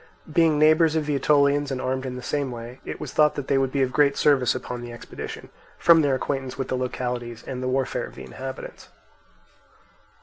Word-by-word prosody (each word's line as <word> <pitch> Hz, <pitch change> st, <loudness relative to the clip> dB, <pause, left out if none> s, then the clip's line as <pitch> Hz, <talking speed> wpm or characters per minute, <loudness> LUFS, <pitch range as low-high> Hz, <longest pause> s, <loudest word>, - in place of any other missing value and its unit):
Being 165 Hz, -2 st, +4 dB
neighbours 155 Hz, +1 st, +5 dB
of 155 Hz, -1 st, 0 dB
the 150 Hz, -, -1 dB
Aetolians 145 Hz, +1 st, +3 dB
and 135 Hz, -2 st, -3 dB
armed 130 Hz, +1 st, -2 dB
in 125 Hz, -, -5 dB
the 125 Hz, -, -7 dB
same 140 Hz, +1 st, -1 dB
way, 120 Hz, +1 st, -8 dB
it -, -, -6 dB
was -, -, -6 dB
thought 150 Hz, -1 st, +4 dB
that 145 Hz, -, -5 dB
they 135 Hz, -, +3 dB
would 135 Hz, -1 st, 0 dB
be 135 Hz, 0 st, +1 dB
of 130 Hz, -, -1 dB
great 140 Hz, 0 st, +3 dB
service 135 Hz, -5 st, +3 dB
upon 125 Hz, -1 st, -5 dB
the 120 Hz, 0 st, -7 dB
expedition, 120 Hz, -, -8 dB, 0.3 s
from 165 Hz, -1 st, +6 dB
their 140 Hz, -3 st, +2 dB
acquaintance 135 Hz, -1 st, -3 dB
with 135 Hz, -, -3 dB
the -, -, 0 dB
localities 125 Hz, -2 st, -4 dB
and 130 Hz, -1 st, -5 dB
the 130 Hz, -, -2 dB
warfare 130 Hz, 0 st, -1 dB
of -, -, -15 dB
the 65 Hz, -, -9 dB
inhabitants. 130 Hz, -, -8 dB
135 Hz, 210 wpm, -24 LUFS, 125-145 Hz, 0.3 s, from